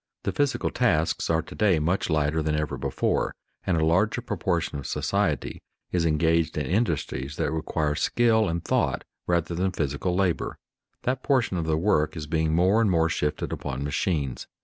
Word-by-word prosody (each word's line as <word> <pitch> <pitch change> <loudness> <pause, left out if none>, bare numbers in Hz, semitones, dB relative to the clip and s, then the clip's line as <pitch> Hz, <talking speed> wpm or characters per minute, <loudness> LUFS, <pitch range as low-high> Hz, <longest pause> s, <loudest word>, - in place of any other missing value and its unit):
The - - 0
physical 145 -2 0
tasks 80 +2 +1
are 80 -1 +2
to - - -11
day 100 -5 +3
much 85 +6 0
lighter 80 0 +1
than 75 0 0
ever 75 -2 -1
before, 65 +1 -1 0.3
and 90 - +2
a 80 - +2
larger 95 +9 +2
proportion 85 - -2
of 70 - -6
society - - -1 0.3
is 85 -2 +1
engaged 80 +1 +2
in 75 - -1
industries 80 - -1
that - - -1
require 80 -1 -1
skill 110 +5 +2
and 85 0 -3
thought - - +1 0.2
rather 85 -1 +1
than 95 +2 0
physical 80 +2 -1
labor. 90 -3 0 0.5
That 130 +1 -1
portion 130 -9 +1
of 80 -2 -2
the 80 -1 +2
work 80 -3 +1
is 75 - -4
being 80 0 0
more 95 +6 +4
and 110 - +3
more 80 -2 +3
shifted 75 -1 -2
upon 70 +1 -4
machines. 75 -3 -1
80 Hz, 175 wpm, -26 LUFS, 75-95 Hz, 0.5 s, more